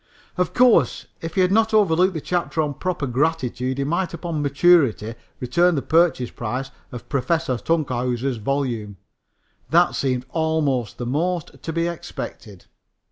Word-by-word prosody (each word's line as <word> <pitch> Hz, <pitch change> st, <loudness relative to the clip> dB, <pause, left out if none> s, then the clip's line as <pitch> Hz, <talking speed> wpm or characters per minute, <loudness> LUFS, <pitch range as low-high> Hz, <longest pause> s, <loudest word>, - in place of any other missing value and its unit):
Of 180 Hz, -2 st, -1 dB
course, 240 Hz, -, +4 dB, 0.2 s
if 165 Hz, 0 st, -6 dB
he 190 Hz, -, +3 dB
had 180 Hz, 0 st, +3 dB
not 220 Hz, +1 st, +3 dB
overlooked 185 Hz, -2 st, +3 dB
the 160 Hz, -, -3 dB
chapter 175 Hz, -1 st, -2 dB
on 145 Hz, -1 st, -2 dB
proper 180 Hz, 0 st, -2 dB
gratitude 130 Hz, -1 st, -1 dB
he 140 Hz, -, 0 dB
might 170 Hz, +5 st, -1 dB
upon 165 Hz, -2 st, -3 dB
maturity 140 Hz, -6 st, +3 dB, 0.3 s
return 170 Hz, +8 st, +2 dB
the 140 Hz, -, -1 dB
purchase 160 Hz, -7 st, +2 dB
price 125 Hz, +4 st, -4 dB, 0.2 s
of 125 Hz, -, -9 dB
Professor 140 Hz, +1 st, 0 dB
Tunkhouser's 125 Hz, -4 st, -1 dB
volume. 115 Hz, -4 st, -2 dB, 0.7 s
That -, -, +4 dB
seemed 125 Hz, -2 st, -1 dB
almost 150 Hz, -7 st, 0 dB
the 120 Hz, -, -4 dB
most 165 Hz, +6 st, -2 dB
to 165 Hz, -, -4 dB
be 165 Hz, +1 st, 0 dB
expected. 105 Hz, -, -7 dB
150 Hz, 145 wpm, -22 LUFS, 125-170 Hz, 0.7 s, course